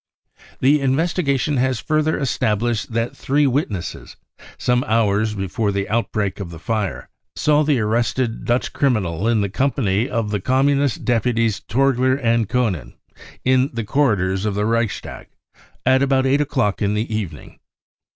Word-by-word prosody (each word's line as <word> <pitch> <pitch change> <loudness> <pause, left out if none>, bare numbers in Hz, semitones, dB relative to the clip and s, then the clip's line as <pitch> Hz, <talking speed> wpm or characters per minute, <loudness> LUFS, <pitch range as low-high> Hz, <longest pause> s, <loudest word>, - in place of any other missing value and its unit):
The 145 +3 +4
investigation 140 0 0
has 130 -2 +1
further 155 +4 0
established 120 -2 -1
that 115 +1 -1
three 145 +2 +1
witnesses, 120 - -2 0.4
some 125 0 +1
hours 110 -1 +1
before 100 +2 -1
the 100 0 -2
outbreak 110 -3 -1
of 95 -4 -5
the 85 - -9
fire, 100 +5 -3 0.3
saw 150 0 +3
the 145 -4 +2
arrested 115 +2 -1
Dutch 120 +1 0
criminal 105 - 0
in 115 -2 +2
the 100 - 0
company 115 -2 0
of 115 -3 -2
the 105 -3 -1
Communist 135 +2 +1
deputies 115 -2 +1
Torgler 130 +2 +1
and 115 -5 +1
Koenen, 95 - -1 0.5
in 130 +1 +3
the 115 -1 -3
cor 125 +2 +2
ridors 95 0 -1
of 105 -2 -1
the 105 +1 0
Reichstag, 115 -2 -2 0.6
at 130 +1 +4
about 135 -1 +2
8 140 +2 +3
o'clock 130 -8 0
i - - +2
x\ 100 +1 0
the 110 +1 -2
even 90 -9 -3
ing. - - -16
115 Hz, 155 wpm, -20 LUFS, 105-135 Hz, 0.6 s, The